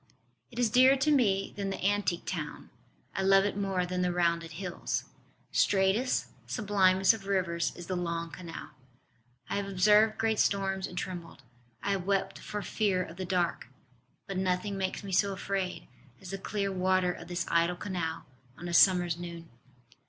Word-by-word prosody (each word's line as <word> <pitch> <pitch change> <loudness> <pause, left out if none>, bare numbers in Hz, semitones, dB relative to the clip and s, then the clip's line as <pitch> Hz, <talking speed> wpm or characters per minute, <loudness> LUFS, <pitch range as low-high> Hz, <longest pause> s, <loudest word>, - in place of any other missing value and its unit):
It 240 - -14
is 240 -3 +2
dearer 260 +3 +7
to 275 +3 +1
me 205 -9 +2
than 200 -1 -3
the 195 - -4
antique 200 -3 0
town: - - -5 0.4
I 195 - -2
love 195 0 +5
it 205 - -1
more 195 -3 0
than 180 0 -2
the 180 0 +1
rounded 170 -2 0
hills: 180 +1 -3 0.5
Straightest, 200 +6 +2 0.2
sublimest 195 -3 +3
of 200 -3 -8
rivers 170 -4 0
is 175 - -8
the 185 - -3
long 170 -1 -3
Canal. 170 -2 -8 0.8
I - - -2
have 200 -1 -2
observed 210 +3 +4
great 220 -1 +1
storms 195 -1 +1
and 180 - -10
trembled: 175 -6 -6 0.4
I 200 - 0
have 190 -2 -2
wept 195 -1 0
for 210 -1 -5
fear 195 -4 0
of 170 0 -10
the 190 - -4
dark. 180 -2 -1 0.6
But 195 -2 -5
nothing 185 +2 0
makes 190 +1 -3
me 195 - -6
so 195 +2 +2
afraid 190 -1 -3 0.3
as 185 - -9
the 195 - -4
clear 200 0 -2
water 185 -1 +2
of 170 - -10
this 175 -1 -2
idle 170 +1 +2
canal 175 -4 -4 0.3
on 175 - -7
a 175 - -4
summer 180 0 +6
s 170 -1 -3
noon. 170 -1 -8
190 Hz, 175 wpm, -30 LUFS, 175-200 Hz, 0.8 s, dearer